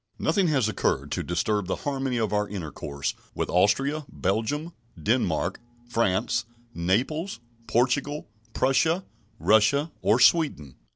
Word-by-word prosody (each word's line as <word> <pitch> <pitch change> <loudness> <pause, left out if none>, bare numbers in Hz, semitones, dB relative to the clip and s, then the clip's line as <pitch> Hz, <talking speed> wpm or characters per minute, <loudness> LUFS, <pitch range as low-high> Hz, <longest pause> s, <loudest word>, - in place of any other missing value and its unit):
Nothing 195 -3 +2
has 135 -8 +2
occurred 110 - -1
to - - -1
disturb 95 +3 -1
the - - 0
harmony 135 -3 -1
of 110 -2 0
our 105 0 0
intercourse 75 -6 -4 0.2
with - - -2
Austria, 135 - +2
Belgium, 130 - -1 0.3
Denmark, 75 - 0 0.3
France, 115 0 +1 0.3
Naples, 120 - -1 0.3
Portugal, 140 +5 +1 0.3
Prussia, 160 +8 +2 0.3
Russia, 140 +9 +3
or 115 - +3
Sweden. 125 - +3
120 Hz, 115 wpm, -26 LUFS, 100-145 Hz, 0.3 s, Russia